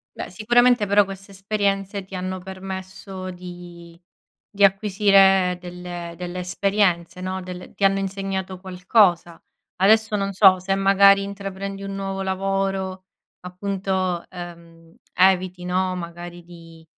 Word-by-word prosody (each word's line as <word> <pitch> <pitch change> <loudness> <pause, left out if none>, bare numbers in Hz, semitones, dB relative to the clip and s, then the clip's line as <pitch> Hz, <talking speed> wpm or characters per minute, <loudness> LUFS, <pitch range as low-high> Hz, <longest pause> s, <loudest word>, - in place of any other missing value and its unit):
Beh - - -6
sicuramente 240 +3 +3
però 205 +1 +5
queste 195 +1 -10
esperienze 195 0 -2
ti 190 - -10
hanno 185 +1 -4
permesso 190 0 -7
di 175 -1 -11 0.5
di 200 -1 -1
acquisire 195 -2 +4
delle 175 -1 -7
delle 180 0 -5
esperienze, 180 -1 0
no. 185 0 -4
Del 180 0 -9
ti - - -5
hanno 195 0 +4
insegnato 195 -1 -4
qualcosa, 180 -2 +1 0.4
adesso 215 +3 +3
non 200 -1 -1
so 190 -1 +6
se 195 +1 -1
magari 195 0 +5
intraprendi 195 0 -6
un 195 0 -5
nuovo 195 0 -4
lavoro 190 0 -2 0.4
appunto, 185 -1 -2
ehm, 170 -2 -11 0.2
eviti 185 -1 +2
no, 185 +1 0
magari 175 0 -8
di, 165 -1 -15
190 Hz, 125 wpm, -22 LUFS, 180-195 Hz, 0.5 s, so